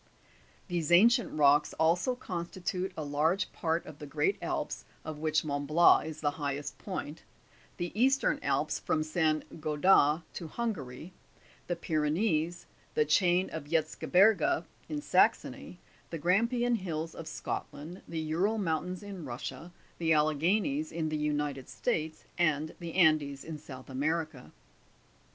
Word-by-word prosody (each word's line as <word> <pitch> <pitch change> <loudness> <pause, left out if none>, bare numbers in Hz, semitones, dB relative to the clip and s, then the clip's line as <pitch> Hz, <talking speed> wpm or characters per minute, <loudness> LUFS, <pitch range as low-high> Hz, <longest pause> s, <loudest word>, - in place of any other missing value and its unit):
these 175 -4 -2
ancient 230 +7 +5
rocks 145 0 +4
also 170 +10 +2
constitute 180 -1 -4
a 155 - -2
krge 160 +7 +1
part 165 0 -1
of 150 -2 -11
the 150 - -8
Great 390 - +1
Alps, - - -3 0.2
of 155 -1 -6
which 155 0 +1
Mont 145 -1 -2
Blanc 165 +1 +5
is 155 -1 -7
the 145 -1 +1
highest 145 0 -3
point, 175 -5 -5 0.6
the 175 -1 -3
Eastern 270 +5 +2
Alps - - 0
from 155 - 0
Saint 155 0 -1
Gothard 155 0 +4
to 170 - -6
Hungary, 165 - -5 0.5
the 175 - -1
Pyrenees, 160 +2 0 0.3
the 455 - +3
chain 180 - +3
of 160 -3 -5
Erzge 155 0 -2
berge, 220 - +5 0.3
in 295 -1 -3
Saxony, - - +1 0.3
the 165 - -4
Grampian 235 - +2
Hills 165 -4 -4
of 165 - -8
Scotland, 160 +2 -6
the 160 -1 -3
Oural 200 +7 +1
mountains, 180 0 -2
in 195 -4 -7
Russia, 130 +5 -6 0.3
the 165 -1 +3
Alleghanies 180 - +1
in 160 -2 -2
the 155 - -2
United 150 -3 -2
States, 155 +5 -2 0.2
and 155 -2 +1
the 170 -2 -6
Andes 155 -6 +3
in 160 -2 -6
South 130 -3 -10
America. 155 +1 -2
160 Hz, 140 wpm, -30 LUFS, 150-185 Hz, 0.6 s, ancient